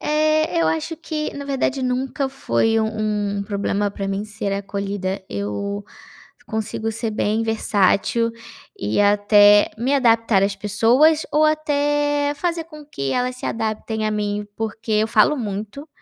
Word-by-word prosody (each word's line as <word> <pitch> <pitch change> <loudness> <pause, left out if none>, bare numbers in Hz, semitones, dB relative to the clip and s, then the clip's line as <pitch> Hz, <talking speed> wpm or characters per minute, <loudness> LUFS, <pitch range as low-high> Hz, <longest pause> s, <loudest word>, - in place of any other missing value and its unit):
Eh, 310 +2 +1
eu - - +2
acho 320 +1 -1
que, 310 -1 -4
na 285 - -6
verdade, 270 -1 -1
nunca 265 +2 -1
foi 225 - 0
um 215 -2 -1
um - - -2
problema 200 0 -1
pra 195 0 -5
mim 195 +1 -2
ser 210 -1 -4
acolhida, 200 -1 -3
eu 105 - -4 0.6
consigo 220 0 -3
ser 225 0 -3
bem 215 +1 0
versátil 225 +1 +1 0.5
e 105 - 0
até 205 0 +5
me 255 +5 +1
adaptar 230 -6 +3
às 200 0 +1
pessoas 235 +10 +3
ou 305 - +3
até 290 -1 +1
fazer 335 +1 -2
com 305 -2 -12
que 140 - -4
elas 250 0 -1
se - - -6
adaptem 220 0 -2
a - - 0
mim, 210 -1 -2
porque 225 0 -4
eu 215 +1 +2
falo 225 +7 +4
muito, 215 +6 -5
220 Hz, 150 wpm, -21 LUFS, 205-285 Hz, 0.6 s, até